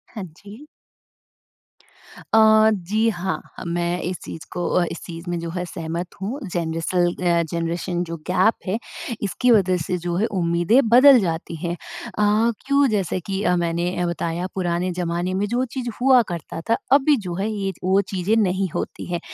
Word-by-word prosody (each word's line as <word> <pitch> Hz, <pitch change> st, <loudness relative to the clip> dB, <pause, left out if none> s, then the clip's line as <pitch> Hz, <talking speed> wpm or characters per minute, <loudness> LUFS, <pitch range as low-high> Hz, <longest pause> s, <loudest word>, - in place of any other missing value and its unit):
हाँ 210 Hz, -, -4 dB
जी। 210 Hz, +8 st, -12 dB, 1.7 s
अ, 220 Hz, 0 st, +6 dB
जी 210 Hz, +4 st, 0 dB
हाँ। 190 Hz, -2 st, -3 dB, 0.2 s
अ, -, -, -6 dB
मैं 175 Hz, +1 st, -1 dB
इस 180 Hz, +1 st, -3 dB
चीज़ 160 Hz, -, -8 dB
को 175 Hz, -, -3 dB
अ, 180 Hz, -, +2 dB
इस -, -, -6 dB
चीज़ 170 Hz, 0 st, -8 dB
में 175 Hz, -, -1 dB
जो 165 Hz, 0 st, -5 dB
है, 180 Hz, +1 st, -3 dB
सहमत 170 Hz, 0 st, -5 dB
हूँ। 225 Hz, +9 st, -3 dB
जनरेशन 170 Hz, +1 st, 0 dB
अ 175 Hz, -1 st, +1 dB
जनरेशन 170 Hz, +1 st, -2 dB
जो 170 Hz, -1 st, -5 dB
गैप 185 Hz, +5 st, +3 dB
है, 190 Hz, -, 0 dB, 0.5 s
इसकी 245 Hz, +5 st, +1 dB
वज़ह 190 Hz, -5 st, +4 dB
से 180 Hz, +1 st, -1 dB
जो 175 Hz, 0 st, -3 dB
है, 200 Hz, +5 st, +2 dB
उम्मीदें 175 Hz, +3 st, +2 dB
बदल 255 Hz, +2 st, +8 dB
जाती 165 Hz, -3 st, -3 dB
हैं। 170 Hz, +2 st, -3 dB
अ, 210 Hz, +5 st, 0 dB
क्यों? 280 Hz, 0 st, +4 dB
जैसे 195 Hz, -3 st, 0 dB
कि 195 Hz, +2 st, -4 dB
अ, 180 Hz, -, +3 dB
मैंने 175 Hz, +1 st, -1 dB
बताया, 170 Hz, +1 st, -2 dB
पुराने 180 Hz, 0 st, -1 dB
ज़माने 175 Hz, +1 st, -1 dB
में 195 Hz, +2 st, 0 dB
जो 240 Hz, +4 st, 0 dB
चीज़ 250 Hz, -2 st, -3 dB
हुआ 260 Hz, -1 st, +6 dB
करता 170 Hz, -1 st, -5 dB
था, 230 Hz, -, +4 dB
अभी 285 Hz, +2 st, +5 dB
जो 175 Hz, -, -3 dB
है, 200 Hz, +4 st, -1 dB
ये 200 Hz, -2 st, -2 dB
वो 190 Hz, +2 st, +3 dB
चीज़ें 195 Hz, +3 st, +1 dB
नहीं 190 Hz, +1 st, 0 dB
होती -, -, -4 dB
हैं। 175 Hz, -, -1 dB
180 Hz, 175 wpm, -22 LUFS, 170-215 Hz, 1.7 s, बदल